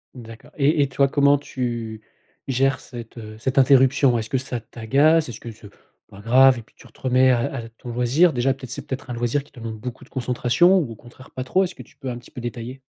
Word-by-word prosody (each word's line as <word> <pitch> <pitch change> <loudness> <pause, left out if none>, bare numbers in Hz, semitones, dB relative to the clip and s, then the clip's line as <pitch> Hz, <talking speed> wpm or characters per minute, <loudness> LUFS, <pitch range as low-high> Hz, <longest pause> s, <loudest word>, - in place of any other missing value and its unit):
D'accord 115 +4 -12
et 150 +2 +3
et 140 - +1
toi, 140 +1 +2
comment 140 +1 +4
tu 120 -5 -5 0.5
gères 135 +1 +1
cette 120 -1 -10 0.2
cette 130 +4 -2
interruption? 135 -1 +4
Est-ce 110 -1 -4
que 130 - 0
ça 125 -1 -4
t'agace? 135 +8 +2
Est-ce 115 - -8
que 115 - -8
c'est 105 -2 -14 0.4
pas 100 - -13
grave 130 +4 +5
et - - -6
puis 110 - -24
tu - - -16
te - - -23
remets 130 0 +4
à 120 - +2
à 115 -4 -6
ton 115 +2 -12
loisir 125 +9 +3
déjà 130 +1 +1
peut-être, 130 -2 -11
c'est - - -7
peut-être 130 -1 -6
un - - -3
loisir 120 +4 -1
qui 145 - -24
te - - -14
demande 115 -1 -6
beaucoup 125 +2 -7
de - - -25
concentration 130 +8 +2
ou 140 -9 -3
au - - -8
contraire 120 +3 -16
pas 130 - -5
trop, 185 +9 +2
est-ce 180 - -8
que - - -10
tu - - -24
peux 130 - -6
un 120 - -4
petit 120 - -15
peu 130 - -9
détailler? 120 +2 -6
125 Hz, 245 wpm, -22 LUFS, 120-135 Hz, 0.5 s, grave